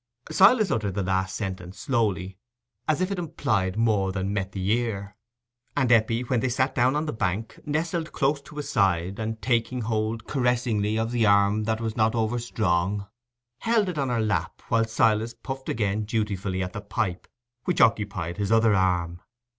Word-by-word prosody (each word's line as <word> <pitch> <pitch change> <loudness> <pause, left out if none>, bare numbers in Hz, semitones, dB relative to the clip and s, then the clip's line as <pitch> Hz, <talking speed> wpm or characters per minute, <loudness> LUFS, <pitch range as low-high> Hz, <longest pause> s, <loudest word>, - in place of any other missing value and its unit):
Silas 210 0 +5
uttered 105 -4 -1
the 100 - 0
last 95 0 -1
sentence 95 -3 -5
slowly, 100 - -1 0.5
as 155 +2 +1
if 185 +2 0
it 195 - -2
implied 110 - -1
more 105 -4 +2
than 95 +1 -2
met 100 -1 -2
the 95 +1 -1
ear; 110 -4 -1 0.6
and 130 -3 +2
Eppie, 115 +1 +3
when 125 -1 0
they 130 - 0
sat 130 +2 +1
down 125 +3 +2
on 150 +1 0
the 150 - -3
bank, 105 +1 -2
nestled 160 +2 -1
close 140 +1 +1
to 150 - -14
his 150 -2 -4
side, 95 -7 +1
and, 110 0 -3
taking 120 0 0
hold 110 0 -2
caressingly 120 -5 0
of 115 +1 -1
the 115 -3 +2
arm 100 +1 +3
that 110 0 0
was 115 -1 -3
not 110 0 +2
over 115 +1 0
strong, 100 -3 0 0.5
held 225 -4 +2
it 165 -5 -3
on 135 -2 0
her 120 -2 0
lap, 110 -1 -1
while 115 -1 +3
Silas 110 +1 +1
puffed 135 +3 -6
again 105 -1 0
dutifully 105 -3 -2
at 90 - -5
the 105 - -5
pipe, 95 -4 -3 0.4
which 180 - 0
occupied 100 -6 +2
his 100 0 -1
other 115 -1 +5
arm. 90 -3 +1
110 Hz, 180 wpm, -26 LUFS, 100-125 Hz, 0.6 s, Silas